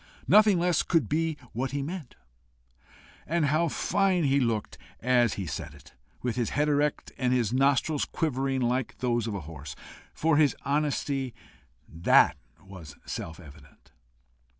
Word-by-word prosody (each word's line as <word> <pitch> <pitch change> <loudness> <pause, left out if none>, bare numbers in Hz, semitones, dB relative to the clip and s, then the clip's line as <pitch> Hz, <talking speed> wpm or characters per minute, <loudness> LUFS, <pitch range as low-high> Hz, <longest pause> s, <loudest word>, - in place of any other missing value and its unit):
nothing 210 -2 +6
less 175 -1 +2
could 165 - +1
be 160 +2 0 0.2
what 130 +4 -2
he 140 0 -3
meant. 160 -3 -7 1.1
And 165 0 +1
how 155 +4 +2
fine 185 +2 +1
he 140 -1 +3
looked 115 -5 -2 0.2
as 120 -2 +2
he 95 - -4
said 70 - -6
it, - - -17 0.3
with 125 -1 -2
his 120 -3 0
head 150 +2 0
erect, 150 0 0
and 125 -2 +1
his 120 -3 +1
nostrils 140 +3 +2
quivering 135 -3 -1
like 125 +1 -1
those 120 -2 0
of 105 - -3
a 100 - -4
horse! 75 -3 -9 0.4
For 160 -1 +2
his 150 -3 +4
honesty, 140 -2 -1 0.5
that 80 +1 +4 0.3
was 90 -7 -11
self 80 0 -6
evident! 75 -3 -16
135 Hz, 150 wpm, -28 LUFS, 115-150 Hz, 1.1 s, nothing